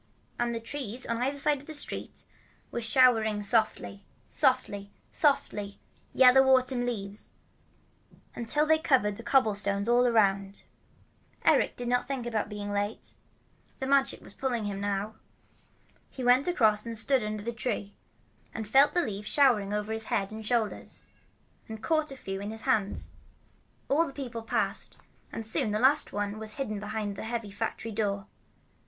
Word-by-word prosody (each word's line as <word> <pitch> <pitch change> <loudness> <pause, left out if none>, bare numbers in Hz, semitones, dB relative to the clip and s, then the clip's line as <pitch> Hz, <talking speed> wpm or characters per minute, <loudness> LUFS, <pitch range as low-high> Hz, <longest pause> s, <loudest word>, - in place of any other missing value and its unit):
And 240 -1 0
a - - -2
tree 240 -1 -6
on 230 - -1
the 250 - +1
other 280 +1 -3
side 290 -1 +2
of 285 - -18
the 315 - -3
street 290 - -4 0.5
was 235 - -3
showering 225 -4 +3
softly, 200 - 0 0.3
softly, 200 0 +1 0.2
softly, 205 -9 +1 0.3
yellow 260 0 +7 0.2
autumn 255 -1 -1
leaves, 205 -3 -4 1.0
until 245 +6 +1
they 315 0 +4
covered 225 -10 +2
the - - -8
cobblestones 205 -5 +1
all 245 +1 +4
around. 200 -4 +1 0.8
Eric - - +3
did 245 - -5
not 245 0 +1
think 265 -3 -3
about 220 -3 -2
being 205 -1 -5
late. 205 +2 -3 0.6
The 265 - -4
Magic 275 0 +2
was - - -13
pulling 250 -4 -2
him 200 -1 -4
now. 205 +2 -2 0.9
He 260 - -7
went 250 +4 +4
across 220 - +3
and 230 -1 -4
stood 255 +2 +1
under 215 -1 -4
the 235 +2 -3
tree, 215 -3 -3 0.6
and 220 -1 -4
felt 275 +8 +5
the 350 - +2
leaves 210 0 -5
showering 240 -9 +3
on 210 0 -1
his 220 +1 -4
head 195 -1 -1
and 220 0 -7
shoulders, 225 -1 -2 0.6
and 220 0 -8
caught 315 -1 +1
a 270 - -8
few 195 -4 -5
in 205 - -5
his 220 0 -5
hands. 215 -6 -1 0.8
All 325 +4 +2
the 275 - -8
people 245 -5 -6
passed, 225 - -1 0.3
and 225 - -5
soon 220 0 +1
the 210 - 0
last 270 +5 +4
one 205 +1 -3
was 215 -1 -3
hidden 215 -7 -4
behind 210 -1 -4
the - - -6
heavy 225 -2 -4
factory 220 +2 -4
door. 200 -2 -2
225 Hz, 165 wpm, -28 LUFS, 205-255 Hz, 1.0 s, yellow